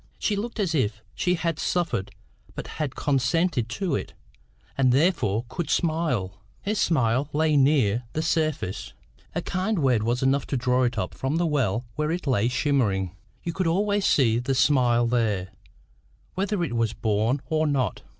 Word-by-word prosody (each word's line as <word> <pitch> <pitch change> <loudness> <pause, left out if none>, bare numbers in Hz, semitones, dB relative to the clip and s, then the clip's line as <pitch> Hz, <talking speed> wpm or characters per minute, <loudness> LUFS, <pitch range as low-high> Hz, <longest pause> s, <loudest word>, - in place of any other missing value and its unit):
She 210 - 0
looked 230 +3 -4
as 185 -6 0
if 115 -6 0
she 180 0 +1
had 165 -2 -2
suffered 150 - -1 0.5
but - - -5 0.2
had 145 -4 -2
consented 135 -1 +1
to 185 +8 -2
it, - - -5 0.6
and 130 -2 +3
therefore 125 - +2
could 170 +6 -4
smile. 125 - 0 0.2
Her 205 - 0
smile 140 - +1
lay 155 0 +2
near 130 -5 +3
the 155 - -1
surface. 155 - -1 0.4
A - - -1
kind 190 +4 -1
word 130 -8 +2
was 120 +4 0
enough 135 +1 +2
to 135 - -1
draw 125 +1 +2
it 120 -1 -2
up 90 -3 -2
from 135 +3 -2
the 170 +1 +1
well 125 - 0
where 150 0 0
it 175 +1 -2
lay 120 -5 +2
shimmering: 120 - 0 0.3
you 170 - -3
could 185 0 -1
always 200 +4 +1
see 115 -5 +3
the 130 +2 -1
smile 125 -4 +3
there, 110 -6 0 0.8
whether 195 -1 -1
it 120 -8 -2
was 115 -1 +1
born 110 +5 0
or 155 +3 +1
not. 135 -5 0
135 Hz, 170 wpm, -25 LUFS, 115-165 Hz, 0.8 s, and